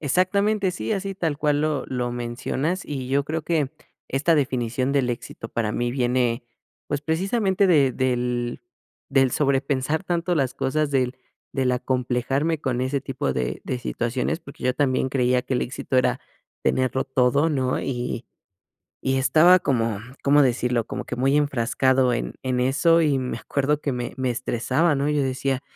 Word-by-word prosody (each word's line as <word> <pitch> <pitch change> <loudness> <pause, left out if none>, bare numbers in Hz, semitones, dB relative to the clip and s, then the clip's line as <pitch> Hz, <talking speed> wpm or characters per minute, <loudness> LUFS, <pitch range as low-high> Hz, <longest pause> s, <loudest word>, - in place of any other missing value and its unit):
Exactamente, 195 +6 +1
sí, 185 +4 -3
así 195 -1 -2
tal 165 -6 -2
cual 150 -1 +1
lo 155 -2 0
lo 125 -1 -2
mencionas, 125 +8 -2
y 130 -3 -5
yo 140 +1 +1
creo 160 +2 -3
que 155 -4 0 0.4
esta 145 +5 +2
definición 130 -2 0
del 135 -3 +2
éxito 115 -1 -5
para 110 -2 -1
mí 120 +2 -1
viene, 125 -1 0 0.4
pues 145 -1 -2
precisamente 190 +5 +1
de 145 -8 +4
del 125 -1 -1 0.5
del 135 -2 +3
sobrepensar 140 +2 0
tanto 175 0 0
las 135 -4 0
cosas 150 +2 0
del 130 -2 0 0.4
del 130 -2 +1
acomplejarme 130 +5 0
con 125 -4 -1
ese 130 +2 0
tipo - - -2
de 65 -1 -2
de 125 - -2
situaciones, 125 +5 -2
porque 140 -4 -11
yo 125 0 +2
también 130 -2 +1
creía 125 -1 +2
que 130 - -3
el 125 - +1
éxito 130 0 -3
era 125 - +2 0.4
tenerlo 130 0 +1
todo, 135 +3 +2
¿no? 130 -4 0
Y 125 -2 -3 0.8
y 135 0 +1
estaba 160 +7 +6
como, 115 - 0 0.2
¿cómo 145 +1 +5
decirlo? 125 -2 +1
Como - - -5
que - - -5
muy 135 +3 +2
enfrascado 130 -2 +2
en - - -3
en 130 -1 0
eso, 155 +6 +3
y 145 -4 +2
me 130 -1 -3
acuerdo 145 +1 0
que 145 - -1
me 120 -1 -4
me 130 -1 0
estresaba, 130 +7 +1
¿no? 140 +1 0
Yo 150 -1 +1
decía, 130 0 -1
135 Hz, 165 wpm, -24 LUFS, 125-150 Hz, 0.8 s, estaba